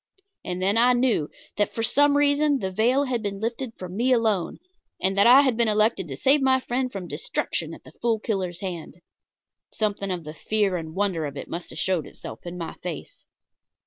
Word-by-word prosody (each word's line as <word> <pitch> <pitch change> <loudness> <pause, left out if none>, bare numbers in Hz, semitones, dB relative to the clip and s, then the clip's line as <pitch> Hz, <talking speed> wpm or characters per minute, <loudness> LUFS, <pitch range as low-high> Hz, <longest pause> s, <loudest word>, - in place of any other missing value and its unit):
And 180 0 -4
then 200 +3 +2
I 250 +1 +5
knew 240 - +2 0.3
that 205 - 0
for 225 - -1
some 285 +4 +4
reason 290 0 +3
the 190 -6 -3
veil 240 +8 +2
had 255 -4 -1
been 200 -2 -4
lifted 235 +2 -3
for 185 - -6
me 230 +8 0
alone, 220 -8 +1 0.4
and 190 +1 0
that 200 +2 +5
I 255 +3 +9
had 260 -4 +2
been 235 0 +2
elected 215 -3 +2
to 135 -2 -6
save 275 - +3
my 260 0 +4
friend 255 0 -2
from 190 -5 -6
destruction - - -3
at - - -17
the - - -14
Fool 230 -2 +2
Killer's 185 -5 -3
hands. 175 -6 -5 0.8
Something 205 -2 -2
of 180 -3 -3
the 155 0 -8
fear 205 +3 0
and 160 -1 -5
wonder 190 -6 0
of 140 - -8
it - - -6
must 170 +1 -6
have - - -9
showed 185 -4 0
itself - - -10
in 175 +1 -6
my 165 -2 -5
face. 175 -4 -7
210 Hz, 210 wpm, -25 LUFS, 180-250 Hz, 0.8 s, I